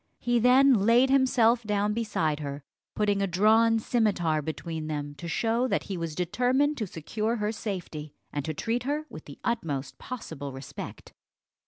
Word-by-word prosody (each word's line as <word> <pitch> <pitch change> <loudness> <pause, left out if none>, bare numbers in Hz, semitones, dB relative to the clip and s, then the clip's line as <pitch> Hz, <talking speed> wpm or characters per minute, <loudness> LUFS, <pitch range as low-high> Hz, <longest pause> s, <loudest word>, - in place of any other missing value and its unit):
He 240 0 +1
then 260 +3 +6
laid 235 +5 +4
himself 250 -3 +4
down 210 -1 0
beside 205 -9 -1
her, 140 -1 -5 0.3
putting 205 -1 +1
a 195 - +1
drawn 220 +5 +4
scimitar 200 -9 +1
between 160 +1 -5
them, 145 -1 -4
to 170 - -6
show 230 +8 +1
that - - 0
he 195 - -5
was 165 -3 -4
determined 250 - +1
to 215 - -2
secure 215 +8 -2
her 210 -2 -1
safety, 175 -9 -6 0.2
and 145 - -2
to 160 - -2
treat 235 +8 -1
her 295 +5 -2
with 155 - -9
the 140 - -11
utmost 150 - -2
possible 145 - -6
respect. 135 0 -9
210 Hz, 165 wpm, -28 LUFS, 160-235 Hz, 0.3 s, then